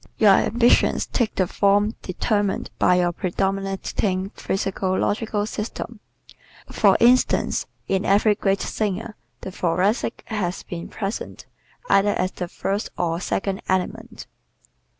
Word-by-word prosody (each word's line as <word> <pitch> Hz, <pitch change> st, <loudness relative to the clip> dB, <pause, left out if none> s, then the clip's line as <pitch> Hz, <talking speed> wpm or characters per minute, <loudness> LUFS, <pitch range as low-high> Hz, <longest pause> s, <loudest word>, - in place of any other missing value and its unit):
Your 210 Hz, -2 st, +6 dB
ambitions 235 Hz, +5 st, +3 dB
take 235 Hz, -4 st, -1 dB
the 185 Hz, -, +2 dB
form 205 Hz, +3 st, +2 dB
determined 205 Hz, +2 st, -1 dB
by 180 Hz, -, +4 dB
your 175 Hz, -1 st, +2 dB
predominating 195 Hz, +1 st, -2 dB
physiological 195 Hz, +2 st, -1 dB
system. 220 Hz, +1 st, -5 dB, 0.7 s
For -, -, +4 dB
instance, 250 Hz, +2 st, +3 dB, 0.2 s
in 195 Hz, 0 st, 0 dB
every 205 Hz, +2 st, +4 dB
great 195 Hz, -1 st, 0 dB
singer 215 Hz, +1 st, -3 dB, 0.3 s
the 190 Hz, -, -6 dB
Thoracic 185 Hz, +7 st, 0 dB
has 190 Hz, -5 st, -3 dB
been 170 Hz, -1 st, -7 dB
present 200 Hz, 0 st, -5 dB, 0.4 s
either 205 Hz, +1 st, +3 dB
as 185 Hz, +1 st, 0 dB
the 180 Hz, -, -5 dB
first 200 Hz, +4 st, -3 dB
or 170 Hz, -1 st, 0 dB
second 195 Hz, +1 st, -2 dB
element. 185 Hz, -1 st, -2 dB
195 Hz, 115 wpm, -23 LUFS, 185-210 Hz, 0.7 s, Your